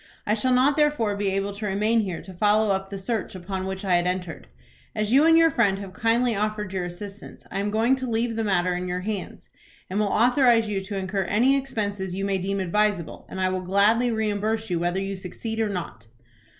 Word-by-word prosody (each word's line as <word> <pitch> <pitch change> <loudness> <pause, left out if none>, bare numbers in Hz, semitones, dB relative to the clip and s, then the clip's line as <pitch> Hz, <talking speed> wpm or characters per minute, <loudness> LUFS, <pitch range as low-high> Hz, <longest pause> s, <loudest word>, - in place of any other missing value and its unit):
I 210 - +1
shall 225 +4 +1
not 260 +4 +4
therefore 295 -9 +2
be 200 0 -2
able 195 +1 -1
to 210 +1 -5
remain 210 +4 +2
here 190 -6 -3
to 190 - -11
follow 210 +3 +3
up 195 0 -1
the 200 - -5
search 200 +1 -3
upon 185 +1 -4
which 190 +1 -5
I 180 -2 +3
had 175 +1 0
entered. 180 -1 -4 0.5
As 215 0 -1
you 285 +4 +6
and 325 0 +6
your 330 -1 +5
friend 200 -5 +2
have 195 -2 -8
kindly 230 +1 +1
offered 210 -1 -2
your 185 -2 -2
assistance, 195 +4 -9
I - - -2
am 205 +1 -1
going 225 +5 +2
to 260 -1 -4
leave 230 0 0
the 225 - -1
matter 180 -3 +1
in 180 +1 -3
your 180 0 -2
hands, 205 0 -5 0.4
and 200 - 0
will 210 - +2
authorize 240 +1 +4
you 200 -2 -2
to 200 0 -4
incur 190 0 -2
any 240 +9 +3
expenses 205 -8 -3
you 195 +1 -2
may 195 -1 0
deem 195 +2 -2
advisable, 190 -2 -1
and 190 - -6
I 185 0 +2
will 185 0 -2
gladly 205 +6 +3
reimburse 220 -1 -1
you 170 - +1
whether 175 +2 0
you 195 0 -3
succeed 220 +4 -6
or 220 -1 +1
not." 170 - -6
205 Hz, 225 wpm, -25 LUFS, 190-225 Hz, 0.5 s, you